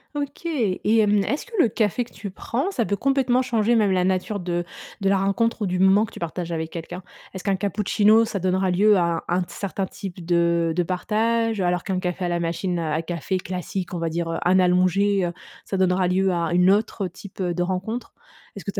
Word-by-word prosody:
OK. 290 +3 -5
Et 225 - +1
hem, 210 -2 +3
est-ce 285 +8 -2
que - - -19
le 295 - +6
café 215 +3 0
que 235 - -18
tu 200 - -7
prends, 260 - -2
ça 255 -11 0
peut 205 - -1
complètement 260 +2 +2
changer 230 -1 +1
même 210 -3 +3
la 185 -1 +2
nature 190 +2 0
de 175 -1 -2 0.4
de 195 - +2
la 195 - +3
rencontre 220 +4 0
ou - - +1
du 180 0 -1
moment 190 +3 +5
que - - -14
tu - - -12
partages 170 0 -4
avec 160 -1 -3
quelqu'un? 175 +2 -7 0.3
Est-ce 190 - -7
qu'un 200 -2 +1
cappuccino, 210 +2 +3
ça 215 -3 -3
donnera 185 +1 +1
lieu 205 +3 +4
à 170 -2 0
un - - +1
un - - +1
t - - -12
certain 195 -1 -3
type 180 -2 -8
de 170 -1 +2
de 175 - +2
partage, 220 +4 0
alors 180 -1 0
qu'un 190 -2 -1
café 180 0 -2
à - - 0
la 175 0 0
machine 170 +1 -2
à 160 0 -1
café 175 +2 -2
classique, 185 +1 -5
on 175 - -3
va 165 0 -1
dire, 165 +1 -2
heu, - - -2
un 185 +1 +4
allongé, 185 +2 +3
heu, 170 - -5 0.3
ça 195 - -3
donnera 185 0 +2
lieu 190 +1 +2
à 170 -1 -1
une 180 +2 +5
autre 205 -1 0
type, 190 +3 -13
heu, 180 -2 0
de 175 - -2
rencontre? 190 +7 -3 0.4
Est-ce - - -9
que - - -2
tu - - -4
190 Hz, 235 wpm, -23 LUFS, 175-210 Hz, 0.4 s, le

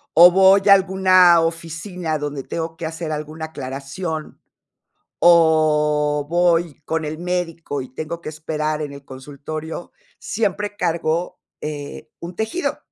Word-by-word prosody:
o 175 +3 +9
voy 190 +1 +6
a 200 - +11
alguna 185 -2 +5
oficina 165 0 -3
donde 145 -2 -4
tengo 165 0 -5
que 165 - -5
hacer 160 0 -5
alguna 155 +1 -5
aclaración, 155 +3 -6 0.8
o 150 -3 +3
voy 170 -3 +1
con 160 -1 -2
el 155 +1 -5
médico, 170 -5 -3
y 130 0 -9
tengo 155 +3 -5
que 170 - -7
esperar 155 0 -3
en 145 -1 -5
el 140 0 -11
consultorio, 150 +5 -8 0.3
siempre 205 -1 -2
cargo, 170 -1 -1 0.2
eh, 145 -1 -6
un 175 +1 -8
tejido. 220 +12 -2
160 Hz, 130 wpm, -21 LUFS, 150-175 Hz, 0.8 s, a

